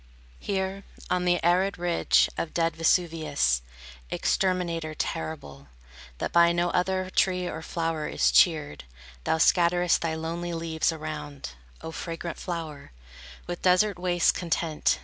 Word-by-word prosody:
Here, 195 0 -3 0.3
on 180 0 +1
the 175 -1 +3
arid 185 +3 +2
ridge 175 -1 +3
Of 165 - -4
dead 165 -1 +1
Vesuvius, 160 - +1 0.5
Exterminator 170 - -1
terrible, 155 -4 -5 0.5
That - - -3
by 170 0 +5
no 175 0 0
other 185 +1 0
tree 180 -1 +1
or 160 - -5
flower 165 -2 -2
is - - +2
cheered, 155 - +3 0.4
Thou - - +2
scatterest 175 +1 +3
thy 165 -1 -1
lonely 170 +2 -4
leaves 165 0 0
around, 150 - -6 0.3
O 160 - -6
fragrant 165 0 -6
flower, 160 -5 -6 0.5
With 175 - -5
desert 185 +1 +3
wastes 175 -1 +3
content. 165 -2 0
170 Hz, 130 wpm, -27 LUFS, 160-180 Hz, 0.5 s, by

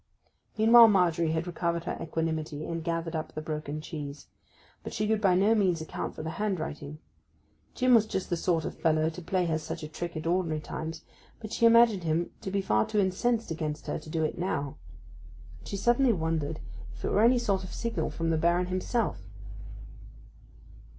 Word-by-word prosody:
Meanwhile 230 +2 +8
Margery 170 -5 +3
had 160 +1 -1
recovered 170 -1 -2
her - - -3
equanimity, 160 -2 -3
and 165 -1 -4
gathered 165 0 -2
up 155 0 -4
the - - -2
broken 155 -1 -4
cheese. 145 -3 -7 0.6
But - - -7
she 210 +1 0
could 220 -1 +1
by 190 -4 +4
no 200 +4 +4
means 190 -6 +2
account 160 - -5
for - - -6
the 160 - -3
handwriting. 155 -7 -3 0.8
Jim 255 0 +3
was 220 -2 +5
just 190 -4 -3
the - - +3
sort 165 -1 0
of - - -4
fellow 160 0 +1
to 180 - -9
play 180 +2 0
her 160 -2 0
such 160 0 -6
a - - -4
trick 170 +2 -5
at 155 - -5
ordinary 170 -2 0
times, 160 +1 -6 0.4
but 215 -1 -8
she 230 - +4
imagined 230 -5 +5
him 165 +1 0
to - - -4
be 195 +1 0
far 110 - +2
too 215 - -2
incensed 215 +3 0
against 155 -2 -3
her - - -3
to 155 - -12
do 160 0 -1
it 155 - -2
now; 160 -7 -2 0.8
and - - -14
she 200 - -4
suddenly 240 +4 +3
wondered 160 -3 -2 0.4
if - - -7
it - - -1
were 205 - +3
any 240 +3 +5
sort 200 -5 0
of 185 - -8
signal 230 -1 -2
from 165 0 -2
the 160 - +2
Baron 170 +3 +2
himself. 185 - -1
170 Hz, 195 wpm, -28 LUFS, 155-200 Hz, 0.8 s, Meanwhile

